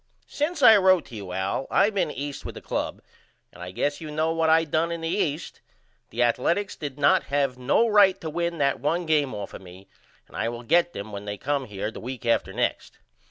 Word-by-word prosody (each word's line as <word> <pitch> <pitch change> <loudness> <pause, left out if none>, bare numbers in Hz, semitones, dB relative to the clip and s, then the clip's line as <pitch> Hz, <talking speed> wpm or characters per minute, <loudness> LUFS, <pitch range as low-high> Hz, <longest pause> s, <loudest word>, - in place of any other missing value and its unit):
Since 300 0 -2
I 220 -3 +9
wrote 185 -3 +4
to 120 - -10
you 100 -4 -7
Al 95 +8 -2
I 205 +2 +3
been 200 -6 0
East 145 -1 -6
with - - -7
the - - -7
club - - -4 0.5
and - - -13
I 90 - -6
guess 145 - -2
you 155 - -6
know 155 +2 0
what 165 -1 +1
I 160 +1 +5
done 160 +2 0
in 170 -1 -4
the 165 - -3
East. 165 -4 -2 0.5
The 120 +2 0
Athaletics 170 - 0
did 145 -2 -6
not 145 -1 +3
have 140 -3 -1
no 140 - +3
right 200 -3 +5
to 160 - -4
win 170 +1 -2
that 140 -2 +1
1 170 +4 -1
game 150 -6 +1
off 100 -1 -6
of - - -9
me 95 +1 -14 0.4
and - - -16
I 115 - -1
will 120 0 -7
get 175 +7 +2
them 100 +2 -7
when 100 0 -7
they 105 0 -4
come 140 +1 -1
here 105 0 -4
the - - -9
week 125 0 -7
after 115 - +1
next. - - -2
145 Hz, 230 wpm, -25 LUFS, 115-170 Hz, 0.5 s, I